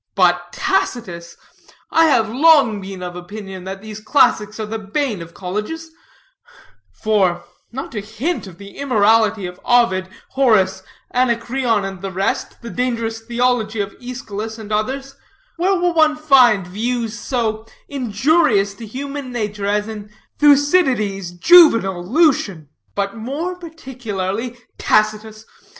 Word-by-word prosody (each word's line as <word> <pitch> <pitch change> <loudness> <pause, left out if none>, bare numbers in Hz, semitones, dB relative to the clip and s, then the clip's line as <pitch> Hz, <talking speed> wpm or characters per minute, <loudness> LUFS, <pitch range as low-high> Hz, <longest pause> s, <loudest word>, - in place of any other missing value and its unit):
But 175 -2 +2
Tacitus! 175 -5 -2 0.5
I 325 - +5
have 250 -8 +3
long 260 -4 +4
been 190 -1 -8
of 175 -1 -6
opinion 190 +1 -8
that 195 +1 -7
these 215 -1 -8
classics 215 -2 +2
are 215 - -2
the 220 +1 -5
bane 215 - -2
of 165 0 -11
colleges; 210 - -5 1.0
for 190 -5 0 0.3
not 265 +4 -6
to 210 - -4
hint 220 - -3
of 175 -3 -12
the 200 +1 -12
immorality 220 -5 +2
of 180 0 -8
Ovid, 210 -7 +2 0.2
Horace, 195 -8 +2 0.3
Anacreon, 240 -3 +1
and 195 -2 -7
the 195 - -4
rest, 190 +1 -2
and - - -31
the 235 - -6
dangerous 230 0 -2
theology 235 -1 0
of 200 -1 -3
Eschylus 225 -3 -6
and 215 -1 -9
others 265 +6 -2 0.4
where 375 +3 +2
will 355 -1 +1
one 310 -2 +4
find 255 - +4
views 230 +4 -3
so 225 -3 -2 0.2
injurious 250 -3 +1
to 225 +2 -10
human 275 +3 -6
nature 210 -4 -3
as 210 +1 0
in 210 -2 -8 0.3
Thucydides, 275 - +3
Juvenal, 195 - +5
Lucian, 205 - +1 0.3
but 200 +1 -2
more 290 +11 -4
particularly 245 - -5 0.2
Tacitus? 215 0 0
220 Hz, 135 wpm, -19 LUFS, 200-260 Hz, 1.0 s, I